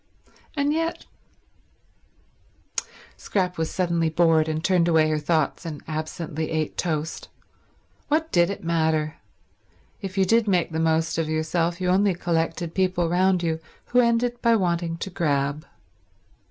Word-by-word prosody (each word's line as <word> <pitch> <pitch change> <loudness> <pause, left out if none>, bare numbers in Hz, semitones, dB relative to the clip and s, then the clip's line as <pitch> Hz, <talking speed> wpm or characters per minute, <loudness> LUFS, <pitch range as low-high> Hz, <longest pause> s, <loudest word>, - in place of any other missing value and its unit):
And 285 +1 +2 2.5
yet—Scrap 180 -3 -1
was 160 - 0
suddenly 170 -3 0
bored, 160 -1 +3
and 155 0 -2
turned 180 -3 +3
away 160 -2 +4
her 155 - +1
thoughts 155 0 0
and 160 -4 -6
absently 155 0 -4
ate 155 -1 -2
toast. 160 -2 -3 0.8
What 320 +2 0
did 175 0 +4
it 200 - -5
matter? 160 -2 0 0.8
If 195 -1 -6
you 190 - +4
did 225 +3 +3
make 180 -4 +2
the 160 - -2
most 160 0 +1
of 160 -1 -1
yourself, 165 +2 0
you 180 -1 0
only 190 0 +3
collected 165 -1 -1
people 180 -3 +1
round 180 +1 +2
you 160 -1 0 0.3
who 250 - +4
ended 240 0 +2
by 230 -1 +4
wanting 170 -4 0
to 195 +3 -5
grab. 145 -4 -1
170 Hz, 140 wpm, -24 LUFS, 160-185 Hz, 2.5 s, away